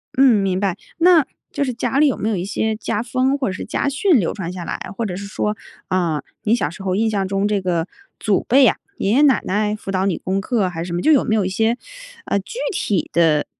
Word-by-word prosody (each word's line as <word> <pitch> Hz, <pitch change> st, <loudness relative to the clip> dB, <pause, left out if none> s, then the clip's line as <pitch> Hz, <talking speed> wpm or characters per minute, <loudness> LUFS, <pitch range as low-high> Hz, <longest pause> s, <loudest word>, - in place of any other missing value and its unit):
嗯， 255 Hz, -6 st, +5 dB
明 190 Hz, -1 st, 0 dB
白， 195 Hz, -3 st, -1 dB, 0.2 s
那 335 Hz, -4 st, +6 dB, 0.3 s
就 -, -, -1 dB
是 255 Hz, -2 st, -2 dB
家 265 Hz, +3 st, -1 dB
里 300 Hz, -, +6 dB
有 270 Hz, -, 0 dB
没 215 Hz, -, -1 dB
有 220 Hz, -, 0 dB
一 180 Hz, -1 st, -3 dB
些 220 Hz, +2 st, -1 dB
家 215 Hz, 0 st, -2 dB
风 260 Hz, +3 st, +1 dB
或 275 Hz, -, -1 dB
者 -, -, -3 dB
是 -, -, -6 dB
家 280 Hz, -, -1 dB
训 280 Hz, +1 st, +3 dB
流 175 Hz, -, -1 dB
传 180 Hz, -4 st, -5 dB
下 180 Hz, -1 st, -6 dB
来， -, -, -4 dB, 0.2 s
或 230 Hz, -, -2 dB
者 185 Hz, -4 st, -3 dB
是 200 Hz, +2 st, -6 dB
说， 210 Hz, +1 st, -2 dB, 0.3 s
啊， 170 Hz, -5 st, 0 dB, 0.2 s
你 220 Hz, +2 st, +3 dB
小 145 Hz, -, -1 dB
时 175 Hz, +5 st, -11 dB
候 190 Hz, -1 st, -1 dB
印 220 Hz, +2 st, +2 dB
象 200 Hz, -3 st, -1 dB
中 195 Hz, +1 st, 0 dB
这 205 Hz, -1 st, 0 dB
个 175 Hz, -2 st, -1 dB, 0.3 s
祖 205 Hz, -4 st, +1 dB
辈 270 Hz, +3 st, +5 dB
呀， 255 Hz, -, +4 dB, 0.2 s
爷 195 Hz, -, 0 dB
爷 260 Hz, +6 st, +4 dB
奶 270 Hz, -8 st, +4 dB
奶 210 Hz, +2 st, 0 dB
辅 205 Hz, -2 st, -7 dB
导 190 Hz, 0 st, 0 dB
你 195 Hz, -3 st, 0 dB
功 190 Hz, +1 st, -2 dB
课， 210 Hz, -3 st, 0 dB
还 165 Hz, -2 st, -5 dB
是 -, -, -6 dB
什 170 Hz, -, -5 dB
么 175 Hz, -, -1 dB
就 315 Hz, -, +4 dB
有 285 Hz, -, +5 dB
没 220 Hz, -, +1 dB
有 210 Hz, -3 st, +1 dB
一 -, -, -1 dB
些， 225 Hz, +5 st, +1 dB, 0.5 s
呃， 200 Hz, -, 0 dB
具 200 Hz, -, -9 dB
体 205 Hz, -, -1 dB
的 160 Hz, -3 st, +3 dB
205 Hz, 280 characters per minute, -20 LUFS, 185-240 Hz, 0.5 s, 那